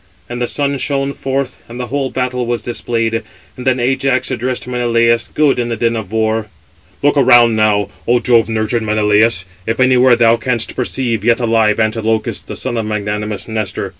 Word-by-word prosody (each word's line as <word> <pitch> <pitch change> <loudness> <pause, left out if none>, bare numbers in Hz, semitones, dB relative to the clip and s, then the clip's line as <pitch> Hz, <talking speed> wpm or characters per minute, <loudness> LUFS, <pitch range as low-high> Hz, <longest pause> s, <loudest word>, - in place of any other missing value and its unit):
And 120 0 -6
the 120 - 0
sun 140 0 -1
shone 140 0 -1
forth, 135 -1 -3
and 120 +2 -8
the 125 - -3
whole 140 -2 0
battle 125 -1 -2
was 120 -1 -2
displayed, 115 -1 -2 0.3
and 125 +1 -7
then 130 0 +2
Ajax 130 +1 0
addressed 125 -1 -3
Menelaus, 115 -1 +1
good 150 -4 +1
in 120 -1 -1
the 115 - -1
din 115 0 0
of 110 -4 -5
war: 110 0 0 0.6
"Look 145 0 +3
around 120 -4 +5
now, 105 -2 +2 0.2
O 120 +1 +3
Jove 115 -1 +3
nurtured 110 +1 -1
Menelaus, 105 -2 +2 0.2
if 115 +2 -1
anywhere 130 -1 +5
thou 115 -1 +4
canst 120 -1 -2
perceive, 120 -3 -2
yet 115 +1 +3
alive, 115 -2 +2
Antilochus, 110 0 -1
the - - -8
son 120 - -3
of 110 -1 -2
magnanimous 105 0 -3
Nestor. 110 -3 -3
115 Hz, 180 wpm, -16 LUFS, 110-125 Hz, 0.6 s, around